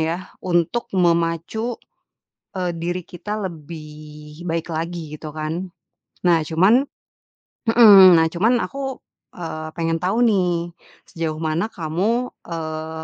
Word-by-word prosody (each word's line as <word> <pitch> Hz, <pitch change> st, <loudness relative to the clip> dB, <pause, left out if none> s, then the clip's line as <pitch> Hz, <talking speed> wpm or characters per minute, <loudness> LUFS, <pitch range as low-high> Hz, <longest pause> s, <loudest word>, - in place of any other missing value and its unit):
yah 170 Hz, +4 st, -3 dB
untuk 175 Hz, +6 st, 0 dB
memacu, 170 Hz, +7 st, 0 dB, 0.8 s
eee, 180 Hz, -1 st, -1 dB
diri 175 Hz, +2 st, -3 dB
kita 210 Hz, +5 st, -6 dB
lebih 150 Hz, -1 st, -11 dB
baik 165 Hz, +1 st, -2 dB
lagi 160 Hz, -1 st, -4 dB
gitu 155 Hz, -, -7 dB
kan. 160 Hz, +4 st, -4 dB, 0.6 s
Nah 170 Hz, -2 st, +5 dB
cuman 190 Hz, +11 st, +4 dB, 0.9 s
hmm, 205 Hz, -5 st, +9 dB
nah 160 Hz, -, +3 dB
cuman 225 Hz, +7 st, +2 dB
aku, 270 Hz, -1 st, -5 dB, 0.4 s
eee, 155 Hz, -2 st, -5 dB
pengen 165 Hz, 0 st, 0 dB
tau 195 Hz, +6 st, 0 dB
nih 175 Hz, -6 st, +1 dB, 0.4 s
sejauh 160 Hz, -2 st, -3 dB
mana 160 Hz, +6 st, 0 dB
kamu, 195 Hz, +10 st, -1 dB, 0.2 s
eee, 160 Hz, -1 st, -5 dB
170 Hz, 115 wpm, -21 LUFS, 160-190 Hz, 0.9 s, hmm